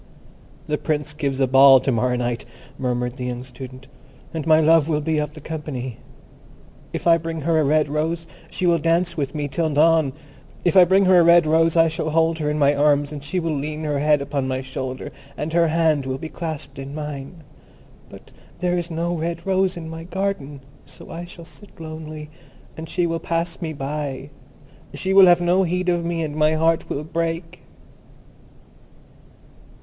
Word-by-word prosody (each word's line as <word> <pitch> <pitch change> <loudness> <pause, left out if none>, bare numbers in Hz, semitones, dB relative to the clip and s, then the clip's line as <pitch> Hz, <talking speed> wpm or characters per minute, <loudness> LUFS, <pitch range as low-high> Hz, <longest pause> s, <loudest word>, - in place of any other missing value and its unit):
"The 150 0 -2
Prince 150 -1 -2
gives 140 -3 -2
a 135 - +4
ball 135 +1 +7
to 135 - 0
morrow 125 +1 +1
night," 120 -1 -2 0.4
murmured 125 -1 -2
the 125 - -4
young 125 0 -4
Student, 130 0 -11 0.5
"and 160 -1 -4
my 155 0 +6
love 160 0 +4
will 150 -2 +1
be 155 +1 0
of 150 0 -3
the - - -9
company. 145 -6 -6 0.9
If - - -5
I 170 -1 +5
bring 165 0 -5
her 160 +2 +2
a - - +3
red 150 +2 +2
rose 160 +3 -2 0.2
she 185 - -3
will 170 -1 +3
dance 165 +3 +1
with 140 -1 -3
me 145 -1 -2
till 160 +3 -1
dawn. 155 -1 +3 0.5
If 175 - +2
I 185 -2 +8
bring 190 +2 +4
her 185 -1 +6
a - - +6
red 170 0 +6
rose, 165 +1 +3
I 165 0 +6
shall 155 0 -3
hold 165 +1 +1
her 150 -1 -1
in 150 - -1
my 145 -1 +4
arms, 145 0 +2
and 145 -2 -7
she 180 +6 -2
will 165 -2 -2
lean 150 +2 -4
her 145 -2 -1
head 150 -1 +2
upon 140 -1 -2
my 130 0 -2
shoulder, 130 0 -6 0.3
and 155 +2 -4
her 170 0 +4
hand 155 -4 +1
will 130 0 -2
be 160 +3 -7
clasped 160 -5 -6
in 135 +1 -7
mine. 150 +2 -7 0.7
But - - -14 0.3
there 180 0 0
is 170 0 -5
no 170 +1 -2
red 170 0 -4
rose 190 -1 +1
in 165 -1 -7
my 165 0 -8
garden, 180 -7 -3 0.2
so - - -13
I 170 +1 -6
shall 175 -1 -12
sit 205 +2 -15
lonely, 155 -1 -8 0.4
and 160 0 -8
she 175 0 0
will 165 -1 -1
pass 170 +1 -3
me 165 -2 -3
by. 140 -1 -5 0.6
She 190 0 -2
will 195 -1 +8
have 175 0 +5
no 175 +2 +3
heed 180 0 0
of 175 -1 +1
me, 170 -1 -2
and 150 -1 -4
my 155 0 +3
heart 160 +1 +1
will 145 - -3
break." 165 +1 -3
155 Hz, 195 wpm, -22 LUFS, 145-170 Hz, 0.9 s, I